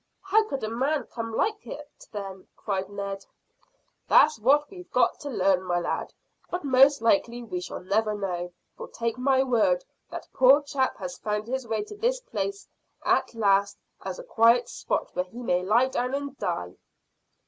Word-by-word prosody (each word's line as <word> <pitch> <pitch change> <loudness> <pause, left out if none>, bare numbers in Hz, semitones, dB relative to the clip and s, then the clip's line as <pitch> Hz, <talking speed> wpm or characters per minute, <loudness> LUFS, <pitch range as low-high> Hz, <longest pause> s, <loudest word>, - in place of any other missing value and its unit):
"How 430 +3 +3
could 275 -3 -3
a - - -1
man 265 +6 0
come 230 -1 -6
like 430 - 0
that, 295 0 -10
then?" 195 -3 -7
cried 195 -2 -3
Ned. 200 -1 -5 0.8
"That's 305 -5 +5
what 285 +6 +4
we've 360 -2 -11
got - - +2
to 290 - -6
learn, 190 -6 +2
my 175 -1 0
lad; 175 - -3 0.4
but 355 -1 -3
most 275 -1 +5
likely 235 +2 +2
we 180 -6 -4
shall - - -6
never 210 +3 0
know, 180 -3 -3 0.2
for, - - -8
take 230 +1 -3
my 265 0 +3
word, 270 - +2 0.2
that - - -7
poor 270 +3 +6
chap 280 -2 -1
has 180 -2 -6
found 210 0 -2
his 260 +1 -3
way 220 - -1
to 420 0 -10
this - - 0
place 405 -5 -4 0.4
at - - +1
last 200 -2 +2 0.3
as - - -5
a - - -8
quiet 235 - +4
spot - - -3
where 180 0 0
he 235 +7 -10
may 180 -5 +1
lie 220 +7 +3
down 250 +1 -1
and 280 -1 -4
die." 90 0 -3
235 Hz, 180 wpm, -26 LUFS, 200-285 Hz, 0.8 s, poor